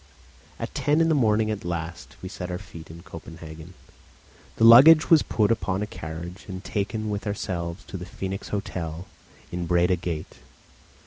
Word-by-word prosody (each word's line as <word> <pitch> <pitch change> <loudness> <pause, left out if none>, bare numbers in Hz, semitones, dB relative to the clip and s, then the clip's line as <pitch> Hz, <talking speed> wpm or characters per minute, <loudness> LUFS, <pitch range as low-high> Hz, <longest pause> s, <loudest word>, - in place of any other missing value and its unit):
At - - -6
ten 145 +2 +1
in 165 0 +3
the - - +4
morning, 110 -5 +2
at 105 - -4
last, 85 0 -5
we - - -4
set 90 -1 -6
our 90 - -3
feet 85 -4 -12
in 85 +1 -11
Copenhagen; 80 -1 -10 0.8
the - - 0
luggage 140 +9 +9
was 160 -3 +8
put 110 -1 +1
upon 95 -2 0
a - - -1
carriage 85 0 -8
and 95 -1 -7
taken 105 +2 -2
with 105 +1 -4
ourselves 90 -2 -4
to 95 - -7
the 90 - -7
Phoenix 95 +2 -5
Hotel 90 -4 -4 0.5
in 85 -1 -3
Breda 90 +1 +3
Gate. 85 -2 -5
95 Hz, 170 wpm, -25 LUFS, 85-105 Hz, 0.8 s, luggage